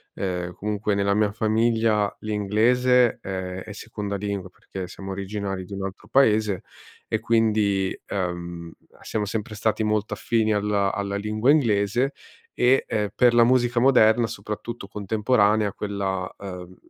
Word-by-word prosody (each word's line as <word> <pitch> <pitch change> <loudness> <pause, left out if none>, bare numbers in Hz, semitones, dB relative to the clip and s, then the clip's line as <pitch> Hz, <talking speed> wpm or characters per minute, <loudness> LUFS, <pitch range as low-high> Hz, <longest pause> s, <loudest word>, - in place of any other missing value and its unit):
ehm, 90 -2 -3
comunque 105 +1 -2
nella 100 0 +1
mia 105 0 +2
famiglia 110 -1 +1
l'inglese, 115 +4 +2
eh, 95 -1 -5
è 105 - -9
seconda 105 -2 -5
lingua 100 -2 -4
perché 95 0 -8
siamo 95 +2 -8
originari 95 -1 -4
di 100 - -10
un 95 - -4
altro 95 0 -8
Paese 110 -7 +3 0.4
e 110 - -1
quindi, 105 -4 +1
uhm, 85 -2 -4 0.3
siamo 105 -2 -2
sempre 105 +1 -4
stati 110 +1 0
molto 105 0 0
affini 110 -2 +1
alla 100 -1 +1
alla 100 0 -3
lingua 110 +6 +1
inglese; 120 -1 +2 0.5
e 125 +2 +4 0.3
per 120 -1 +4
la 120 - +7
musica 120 0 +3
moderna, 120 -3 +5
soprattutto 110 0 -6
contemporanea, 105 0 +1
quella, 95 -3 -3
uhm, 90 -2 -8
105 Hz, 135 wpm, -24 LUFS, 100-110 Hz, 0.5 s, la